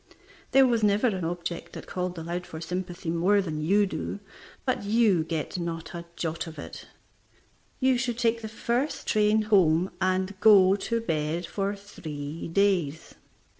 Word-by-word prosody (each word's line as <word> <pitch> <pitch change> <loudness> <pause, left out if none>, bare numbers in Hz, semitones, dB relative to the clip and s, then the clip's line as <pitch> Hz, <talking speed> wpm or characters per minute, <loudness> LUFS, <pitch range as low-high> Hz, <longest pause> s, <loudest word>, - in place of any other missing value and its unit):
There 270 0 +6
was 235 -3 +2
never 210 +2 +3
an 190 -7 0
object 170 0 -4
that - - -8
called 180 -1 -4
aloud 175 +2 -4
for 160 - -7
sympathy 175 0 -4
more 180 +5 +3
than 160 -6 -2
you 200 +6 +3
do, 200 - -4 0.5
but 255 -5 0
you 205 -5 +3
get 160 +2 -3
not 165 -1 -5
a 170 0 -6
jot 165 0 -3
of 160 -1 -9
it. 145 - -9 0.9
You 260 -2 +3
should 245 -2 -2
take 230 -1 +1
the 220 - -6
first 240 +6 -2
train 215 0 +3
home 185 -4 +3
and 185 +1 +1
go 195 -3 +7
to 230 +3 -2
bed 165 -3 -1
for 195 +3 -2
three 160 -7 -7
days. 170 -4 +1
185 Hz, 160 wpm, -27 LUFS, 165-210 Hz, 0.9 s, go